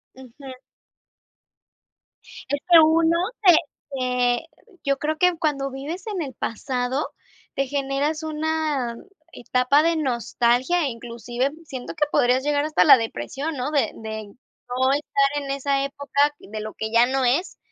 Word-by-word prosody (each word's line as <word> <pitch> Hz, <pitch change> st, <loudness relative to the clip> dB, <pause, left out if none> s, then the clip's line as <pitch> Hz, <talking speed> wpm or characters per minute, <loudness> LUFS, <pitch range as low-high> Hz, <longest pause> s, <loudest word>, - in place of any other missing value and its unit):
Ujú. 260 Hz, +1 st, -11 dB, 2.0 s
Es 285 Hz, -, 0 dB
que 345 Hz, -2 st, +8 dB
uno 325 Hz, +1 st, +3 dB, 0.3 s
te 360 Hz, -4 st, +8 dB, 0.4 s
te 250 Hz, +1 st, 0 dB, 0.4 s
yo 275 Hz, -1 st, +1 dB
creo 310 Hz, +1 st, -1 dB
que 360 Hz, +1 st, +3 dB
cuando 275 Hz, -3 st, -1 dB
vives 310 Hz, +9 st, -6 dB
en 400 Hz, -5 st, -3 dB
el 270 Hz, -4 st, -5 dB
pasado, 250 Hz, +4 st, -2 dB, 0.5 s
te 275 Hz, -, 0 dB
generas 280 Hz, +3 st, -1 dB
una 310 Hz, -5 st, -1 dB, 0.4 s
etapa 250 Hz, +4 st, +2 dB
de 335 Hz, 0 st, +2 dB
nostalgia 255 Hz, +3 st, +1 dB
e -, -, 0 dB
inclusive 240 Hz, +2 st, -3 dB
siento 260 Hz, -5 st, -7 dB
que 295 Hz, -, +2 dB
podrías 250 Hz, +2 st, +3 dB
llegar 290 Hz, 0 st, +1 dB
hasta 310 Hz, 0 st, +3 dB
la 275 Hz, -3 st, +9 dB
depresión, 230 Hz, -, -4 dB
¿no?, 260 Hz, +3 st, -3 dB
de 285 Hz, -3 st, +1 dB
de 220 Hz, -1 st, -6 dB
no 255 Hz, +3 st, -3 dB
estar 285 Hz, 0 st, 0 dB
en 275 Hz, -, -7 dB
esa 275 Hz, 0 st, 0 dB
época 285 Hz, +1 st, 0 dB
de 215 Hz, +2 st, -8 dB
lo 215 Hz, 0 st, -6 dB
que 220 Hz, 0 st, -4 dB
ya 235 Hz, +1 st, +5 dB
no 265 Hz, +1 st, 0 dB
es, 280 Hz, +10 st, 0 dB
275 Hz, 145 wpm, -23 LUFS, 250-300 Hz, 2.0 s, la